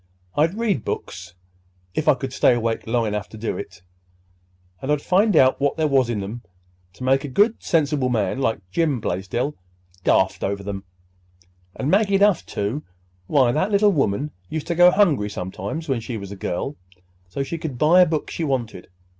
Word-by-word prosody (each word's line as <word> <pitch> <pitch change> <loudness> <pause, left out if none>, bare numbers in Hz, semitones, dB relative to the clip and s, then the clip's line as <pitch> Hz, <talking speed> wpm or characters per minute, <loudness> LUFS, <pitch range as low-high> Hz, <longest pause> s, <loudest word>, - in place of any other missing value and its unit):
"I'd 165 +7 +2
read 210 - 0
books—if 90 - -7
I 150 - +6
could 130 0 -6
stay 125 - +4
awake 115 -1 -2
long 115 0 +1
enough 105 -1 -3
to 110 - -11
do 110 +1 -3
it—and 90 +3 -11
I'd 150 - +2
find 195 +5 +2
out 130 -1 +4
what 145 +2 +1
there 160 -1 +2
was 135 -4 +2
in 105 -4 -2
'em 110 +5 -6 0.5
to 125 - -10
make 135 +2 +2
a - - -4
good 205 - +2
sensible 145 -5 +1
man 110 0 0
like 110 -7 -1
Jim 150 - +1
Blaisdell 105 +9 -2 0.5
daft 95 - +2
over 100 0 -3
'em—and 90 - -9
Maggie 200 0 +3
Duff, 200 -3 +3
too. 105 +9 -2 0.5
Why, 130 -5 +3
that 155 +9 0
little 205 0 +4
woman 140 - 0 0.2
used 155 -2 -4
to 170 - -1
go 175 +1 +7
hungry 170 - +2
sometimes, 100 - -5
when 135 -4 0
she 115 +1 -5
was 100 -1 -8
a - - -6
girl, 95 +9 -4 0.5
so 135 +10 -3
she 165 +4 -5
could 150 -6 -5
buy 165 +7 +5
a 180 - +6
book 155 -2 -2
she 165 - -3
wanted. 125 - -3
120 Hz, 180 wpm, -22 LUFS, 95-155 Hz, 0.5 s, go